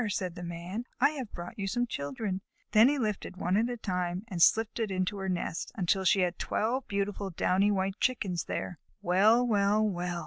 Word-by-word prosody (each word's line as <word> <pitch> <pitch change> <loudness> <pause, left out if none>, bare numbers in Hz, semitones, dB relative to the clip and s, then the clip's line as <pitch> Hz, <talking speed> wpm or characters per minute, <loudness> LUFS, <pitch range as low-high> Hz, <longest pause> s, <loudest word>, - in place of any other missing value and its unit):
said 185 -3 -2
the 175 - -9
Man, 175 +6 -5
"I 280 +4 +5
have 265 -8 -6
brought 175 +5 -8
you 195 - -2
some 245 +4 0
children." 185 - -4 0.3
Then 220 +4 +7
he 290 - +1
lifted 210 -6 -3
one 180 0 0
at 225 +4 +2
a 245 - -3
time 180 -3 -2
and 180 -6 -4
slipped 225 +6 +4
it 220 -2 0
into 185 +1 -1
her 190 -1 -3
nest, 175 -2 -3
until 190 0 +1
she 190 +2 +4
had 180 -1 0
twelve 240 +5 -1
beautiful 200 0 -2
downy 190 +3 +2
white 195 -1 -1
Chickens 195 -9 0
there. 175 - -4 0.2
"Well! 210 +7 +4
Well! 210 -1 +3
Well!" 175 -2 -2
195 Hz, 200 wpm, -30 LUFS, 180-220 Hz, 0.3 s, Then